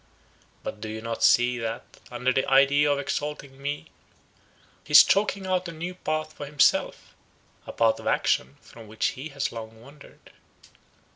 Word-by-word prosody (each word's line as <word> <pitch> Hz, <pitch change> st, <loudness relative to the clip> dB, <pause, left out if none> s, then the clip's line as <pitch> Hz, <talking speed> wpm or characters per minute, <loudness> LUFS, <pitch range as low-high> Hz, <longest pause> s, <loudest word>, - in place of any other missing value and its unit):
But 105 Hz, -, -7 dB
do 110 Hz, -, -5 dB
you 110 Hz, 0 st, -5 dB
not 115 Hz, 0 st, -5 dB
see, 120 Hz, +2 st, +4 dB
that, 115 Hz, 0 st, -4 dB, 0.2 s
under 125 Hz, +1 st, -1 dB
the 130 Hz, -, 0 dB
idea 140 Hz, +2 st, +4 dB
of 145 Hz, -, +1 dB
exalting 140 Hz, -1 st, -5 dB
me, 145 Hz, +1 st, -5 dB, 0.9 s
he -, -, -9 dB
is -, -, +11 dB
chalking 200 Hz, -1 st, +1 dB
out 185 Hz, -1 st, -1 dB
a -, -, -6 dB
new 170 Hz, +3 st, -6 dB
path 155 Hz, -3 st, -4 dB
for 145 Hz, -1 st, -8 dB
himself; 145 Hz, -1 st, +1 dB, 0.5 s
a -, -, -5 dB
path 115 Hz, -1 st, +1 dB
of -, -, -8 dB
action 65 Hz, +2 st, 0 dB
from 115 Hz, -2 st, -14 dB
which 110 Hz, +1 st, -1 dB
he 140 Hz, +5 st, -8 dB
has 140 Hz, -1 st, -3 dB
long 110 Hz, -1 st, -9 dB
wandered? 140 Hz, +5 st, -17 dB
135 Hz, 165 wpm, -25 LUFS, 115-150 Hz, 0.9 s, is